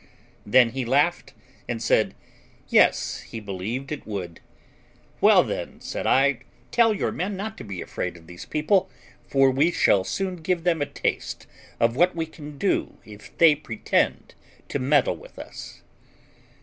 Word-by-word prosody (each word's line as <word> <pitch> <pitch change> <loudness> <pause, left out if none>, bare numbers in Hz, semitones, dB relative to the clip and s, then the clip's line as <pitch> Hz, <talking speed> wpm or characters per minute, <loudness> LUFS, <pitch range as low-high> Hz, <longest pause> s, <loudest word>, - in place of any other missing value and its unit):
Then 120 +2 +5
he 130 +1 -3
laughed, 140 +3 +1 0.4
and 120 -1 -2
said, - - +2 0.5
yes, - - +3
he 115 - -8
believed 105 +7 -5
it 150 - -6
would. 90 -6 -5 0.8
"Well, - - +7
then," - - -5
said - - -4
I, 135 -1 +3 0.3
"tell 230 -1 +4
your - - -1
men 190 +3 -3
not 215 +3 -5
to - - -7
be 100 -4 -6
afraid 90 -1 -4
of 80 - -17
these 90 +1 -10
people, 155 +5 +1 0.4
for 135 -1 +4
we 140 +6 +3
shall 105 - +3
soon 185 - -3
give 170 +1 -1
them 165 -3 +1
a 145 - 0
taste - - -3 0.3
of 115 0 +2
what 175 +5 +3
we 165 -1 -1
can 150 -2 -11
do 195 - 0
if 105 -1 -14
they 165 -2 +7
pretend 120 -7 -1 0.4
to 140 - -2
meddle 130 - +2
with - - -16
us." - - -10
135 Hz, 160 wpm, -24 LUFS, 115-165 Hz, 0.8 s, Well